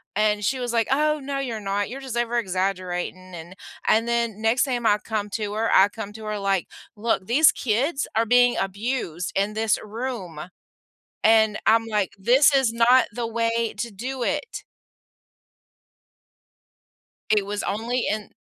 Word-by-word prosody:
and 210 0 +1
she 260 +3 0
was 240 -1 -3
like, 230 -1 +1
"Oh 305 +2 +2
no, 275 0 -3
you're 235 -5 -3
not, 200 +1 -2
you're 270 +2 -7
just 255 -3 -5
over 240 0 0
exaggerating, 185 -2 -3
and" 170 +3 -10 0.3
and 225 +2 +3
then 235 -3 -1
next 225 +3 +2
time 245 -4 -2
I 205 - +4
come 210 -2 -3
to 210 -2 -3
her, 225 +1 0
I 195 +1 +7
come 210 -1 -8
to 220 0 -10
her 215 -1 -3
like, 195 -2 0 0.3
"Look, 210 -3 -1
these 285 +6 +5
kids 270 +6 -1
are 225 - +2
being 245 +1 +4
abused 195 -3 -3
in 200 +2 0
this 220 -1 +1
room, 215 -7 -6 0.8
and 220 -1 +4
I'm 225 +1 +4
like, 210 -4 -1
'This 260 +9 +4
is 265 -4 +3
not 240 +2 +5
the 235 0 -3
way 230 0 -1
to 235 +2 -4
do 250 +6 -6
it.'" 460 - -3 2.7
It 210 -2 +2
was 205 +1 -4
only 235 +5 -2
in 210 -1 -3
225 Hz, 165 wpm, -24 LUFS, 205-240 Hz, 2.7 s, I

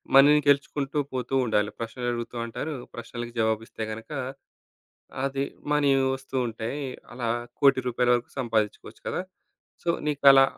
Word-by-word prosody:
మనీ‌ని 145 +2 +8
గెలుచుకుంటూ 140 0 +1 0.2
పోతూ 125 0 -3
ఉండాలి. 105 -2 +2
ప్రశ్నలడుగుతూ 120 0 -3
అంటారు. 145 +7 -4 0.2
ప్రశ్నలకి 120 0 -6
జవాబిస్తే 110 0 0
గనక 110 +1 -7 1.2
అది 135 0 0 0.3
మనీ 145 -1 +4 0.3
వస్తూ 135 0 -7
ఉంటాయి. 115 +6 -4 0.3
అలా 120 -1 -3 0.3
1,00,00,000 135 -2 +6
రూపాయలు 125 0 +3
వరకు 120 0 -2
సంపాదిచ్చుకోవచ్చు 110 -4 -1
కదా! - - -1 0.6
సో 170 - +3 0.2
నీకలా 140 -2 +7
125 Hz, 120 wpm, -27 LUFS, 115-140 Hz, 1.2 s, మనీ‌ని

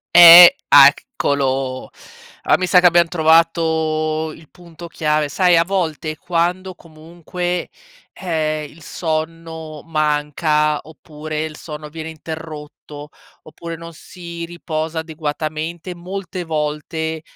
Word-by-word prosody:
Ehm, 175 0 +11 0.2
ah, - - +9
eccolo. 135 - -2 0.5
Allora - - +3
mi 185 - -1
sa 180 0 +5
che 180 - 0
abbiam 170 0 +4
trovato 160 -1 +1
il 160 -2 -17
punto 170 -1 -13
chiave. 150 -2 -1
Sai 180 +2 +3
a 165 - +4
volte 165 -4 -3
quando 180 +3 -2
comunque, 170 +2 -6 0.4
ehm, 155 -4 -3
il 165 - -18
sonno 160 -1 -5
manca, 150 -1 0
oppure 155 0 -7
il 155 -1 -7
sonno 150 -1 -9
viene 160 +1 -8
interrotto, 155 -2 -10 0.3
oppure 165 +1 -9
non 165 0 -11
si 170 -1 -9
riposa 160 -1 -5
adeguatamente, 160 +2 -5
molte 180 +1 -7
volte, 160 +1 -3
160 Hz, 115 wpm, -18 LUFS, 155-170 Hz, 0.5 s, Ehm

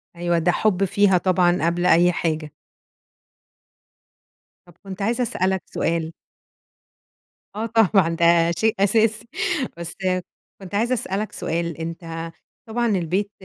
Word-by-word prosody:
أيوه، 175 0 0
ده 175 +2 +2
حُب 195 0 +1
فيها 195 0 +3
طبعًا 180 -2 +2
قبل 175 +1 0
أي 175 0 +5
حاجة. 155 -3 -2 2.1
طَب 175 - -18
كنت 195 0 -8
عايزة 235 +4 0
أسألك 190 -4 0
سؤال 165 -1 -2 1.4
آه، 220 +2 -2
طبعًا 210 -6 +3
ده 170 0 +4
شيء 220 +4 +1
أساسي. 220 +2 +2 0.5
بس 170 0 -4 0.7
كنت 195 +1 -8
عايزة 235 +4 +1
أسألك 210 -2 -2
سؤال، 170 0 -3
أنت 165 0 -6 0.4
طبعًا 235 +1 -1
البيت 195 +1 -1
180 Hz, 115 wpm, -22 LUFS, 170-210 Hz, 2.1 s, أي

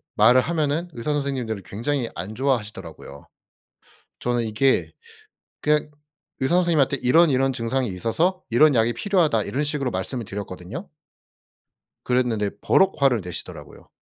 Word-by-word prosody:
말을 130 +1 +6
하면은 160 +2 -1
의사 120 +6 -2
선생님들이 130 -7 -2
굉장히 120 +3 -2
안 95 +6 -6
좋아하시더라고요. 105 - -4 0.9
저는 120 -1 0
이게 120 +5 +1 0.7
그냥 150 0 +1 0.5
의사 130 +5 +1
선생님한테 160 -6 +2
"이런, 160 +6 +5
이런 135 0 +2
증상이 125 +1 -1
있어서 160 - 0
이런 140 +5 +5
약이 115 +1 +3
필요하다." 160 - +1
이런 145 +4 -2
식으로 145 -3 -1
말씀을 115 +5 -3
드렸거든요. 100 - -7 1.2
그랬는데 120 -5 0
버럭 190 0 +3
화를 130 -5 +3
내시더라고요. 90 -1 -8
130 Hz, 350 characters per minute, -23 LUFS, 110-150 Hz, 1.2 s, 말을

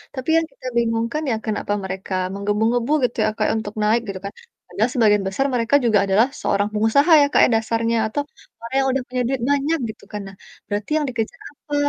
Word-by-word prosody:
tapi 260 +3 -5
yang 330 - +2
kita 275 - -18
bingung 230 -1 +1
kan 305 +1 -2
ya - - +1
kenapa 210 -1 -2
mereka 190 0 -5 0.2
menggebu-gebu 220 +5 0
gitu 245 - 0
ya, - - +2
Kak, 215 - +1
ya - - +1
untuk 210 -1 -6
naik 220 +3 +3
gitu 190 -1 -5
kan 200 - -5 0.4
padahal 225 +4 0
sebagian 210 -3 +4
besar 230 +8 -1
mereka 230 +3 +2
juga 215 -3 +4
adalah 200 +5 +3
seorang 200 +1 +1
pengusaha 225 +10 +3
ya, - - +5
Kak, - - +3
ya - - +1
dasarnya 230 +1 0
atau 220 +7 -2 0.4
orang 230 +3 -6
yang 270 - +1
udah 260 -1 -1
punya 250 0 -2
duit 265 -2 -2
banyak 285 +3 +1 0.2
gitu - - -25
kan. 210 - -5
Nah, 195 - -11 0.3
berarti 205 +5 -4
yang 305 - 0
dikejar 225 -3 -4
apa? 290 +2 -7
230 Hz, 215 wpm, -21 LUFS, 210-260 Hz, 0.4 s, ya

